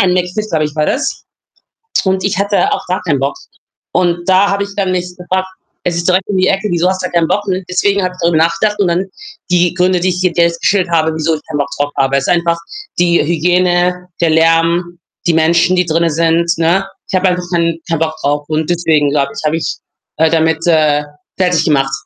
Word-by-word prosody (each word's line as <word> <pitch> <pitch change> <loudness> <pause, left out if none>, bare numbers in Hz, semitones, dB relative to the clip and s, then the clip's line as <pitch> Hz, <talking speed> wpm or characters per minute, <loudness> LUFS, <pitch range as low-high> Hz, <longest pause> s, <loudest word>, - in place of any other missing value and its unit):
Ein 180 -2 +2
McFIT, 185 +4 -1
glaube 155 -2 +1
ich, 150 - -4
war 150 -1 0
das 275 0 -2 0.8
und 190 -1 0
ich 195 -2 0
hatte 200 +1 +1
auch - - -2
gar 185 +1 -2
keinen 155 -6 0
Bock 135 +1 -1 0.6
und 175 0 0
da 190 +2 +4
habe 200 0 0
ich - - -8
dann 190 -2 0
mich 180 0 -3
gefragt: 185 +1 -2 0.4
„Es 175 -1 -1
ist 170 - -1
direkt 185 +2 +1
um 200 - -1
die 185 0 +2
Ecke, 195 +2 0
wieso 175 +1 +1
hast 185 0 -1
du 185 - -3
keinen 170 -1 +2
Bock?“, 205 0 -1
ne? 185 0 -1
Deswegen 200 +1 +1
habe 185 - -1
ich - - -19
darüber 170 -1 +2
nachgedacht 210 +5 0
und 195 -3 +2
dann 180 +3 0 0.4
die 175 -1 +3
Gründe, 180 0 +1
die 185 +1 +1
ich 180 +1 -3
dir 180 -2 +1
jetzt 170 -1 +2
geschildert 190 -4 +1
habe, 160 -1 +2
wieso 160 +1 0
ich 150 - -5
keinen 150 -2 -3
Bock 145 - -1
drauf 145 0 0
habe 135 0 +2
ist 135 - -3
einfach 170 -1 +1 0.4
die 175 -1 +3
Hygiene, 180 +2 +1
der 170 - +2
Lärm, 165 +2 +2 0.3
die 170 - +3
Menschen, 170 +3 +3
die 180 -1 +2
drinnen 165 +1 +1
sind, 165 +2 +1
ne? 170 +4 +2 0.3
Ich - - -5
habe 185 +1 +2
einfach 180 0 -1
kein 170 -1 +1
keinen 165 -1 -1
Bock 160 -1 0
drauf 145 +1 -1
und 155 0 -1
deswegen, 160 -4 +2
glaube 140 -1 0
ich, - - -5
habe 155 +2 +1
ich, 165 - -3 0.4
äh, 160 - +4
damit, 160 0 +1
äh, 155 -3 +3 0.3
fertig 180 -3 +2
gemacht 135 -3 +1
175 Hz, 225 wpm, -14 LUFS, 160-185 Hz, 0.8 s, da